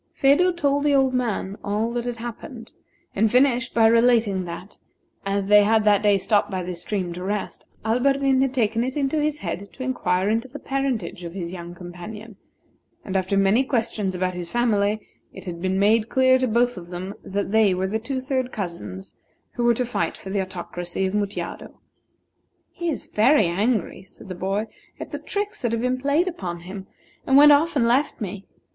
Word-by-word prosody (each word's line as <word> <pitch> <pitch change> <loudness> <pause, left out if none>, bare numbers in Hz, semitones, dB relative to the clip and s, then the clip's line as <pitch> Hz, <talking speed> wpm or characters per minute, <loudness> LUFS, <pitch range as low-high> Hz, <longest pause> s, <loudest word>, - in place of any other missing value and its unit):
Phedo 290 +7 +4
told 285 -4 0
the 290 -1 +3
old 265 -1 +3
man 220 -5 -2
all 215 +3 -1
that 240 0 -2
had 245 -1 -3
happened, 230 +1 -8 0.4
and 215 +2 +2
finished 255 -1 +3
by 225 -1 +5
relating 225 -4 +3
that, 175 +3 -9 0.5
as 200 0 0
they 210 +1 +6
had 220 +1 +3
that 205 -1 +4
day 205 -1 +4
stopped 200 +2 +1
by 185 -2 -3
this 175 -1 -5
stream 180 -2 -3
to 180 +1 -7
rest, 205 +1 -4 0.2
Alberdin 270 +3 +2
had 270 -1 +2
taken 230 -3 +1
it 260 +3 -3
into 290 +2 0
his 300 0 0
head 185 +4 -5
to 260 - -8
inquire 195 -7 0
into 225 +4 0
the 265 +3 -9
parentage 265 -12 -3
of 170 +1 -7
his 175 -2 -5
young 175 -1 -8
companion; 185 +5 -9 0.7
and 190 - -5
after 190 +1 +1
many 195 +6 +4
questions 225 -7 -1
about 185 0 -1
his 175 -1 -6
family, 215 -3 +1 0.3
it - - -11
had 170 -2 -6
been 190 +1 0
made 215 +3 +3
clear 260 0 +4
to 255 - +1
both 240 +1 +1
of 175 -1 -8
them 180 +2 -6
that 200 0 -3
they 220 -2 +4
were 185 +1 -1
the 210 +3 -1
two 260 +4 -3
third 260 -1 -2
cousins 105 - -6 0.4
who 240 - -2
were 235 0 +4
to 250 - 0
fight 170 -8 -2
for 190 - -8
the 200 0 0
Autocracy 175 0 -4
of 190 - -2
Mutjado. 205 -1 -4 0.9
"He 345 -1 -3
is 300 - -4
very 225 +2 +4
angry," 200 +4 0
said 190 +1 -15
the - - -4
boy, 195 +4 -2 0.3
"at - - -7
the - - -4
tricks 410 0 -4
that 240 -3 0
have 230 0 -1
been 250 +1 -1
played 290 +6 +2
upon 175 - -5
him, 190 +2 -8 0.4
and 270 - +5
went 295 +1 +9
off 300 +3 +3
and 240 -5 +3
left 265 +5 +1
me. 200 -2 -6
215 Hz, 200 wpm, -23 LUFS, 190-255 Hz, 0.9 s, went